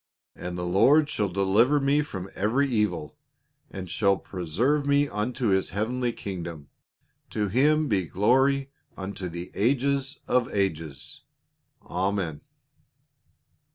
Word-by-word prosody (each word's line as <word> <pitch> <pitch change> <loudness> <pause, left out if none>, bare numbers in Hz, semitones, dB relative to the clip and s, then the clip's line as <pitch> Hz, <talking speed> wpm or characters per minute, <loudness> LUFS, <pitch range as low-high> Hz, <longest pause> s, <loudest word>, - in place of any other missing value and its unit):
" - - -66
And 90 0 -6
the 90 - -3
Lord 140 - +4
shall 105 -7 0
deliver 100 +10 +3
me 140 +2 +2
from 95 -11 -6
every 120 +8 +1
evil, 105 - -1 0.5
and 95 -1 -7
shall 100 +2 +2
preserve 100 - -1
me 145 0 +3
unto 115 +2 -2
his 95 -1 +2
heavenly 120 +5 -1
kingdom. 85 -9 -7 0.6
To 105 -2 -1
Him 150 +7 +3
be 95 -8 0
glory 135 - +2 0.3
unto 95 -1 -5
the 85 +1 -7
ages 135 +4 +1
of 125 -1 +1
ages. 80 -8 -3 0.6
Amen." 90 -4 -2
105 Hz, 120 wpm, -26 LUFS, 90-135 Hz, 0.6 s, Lord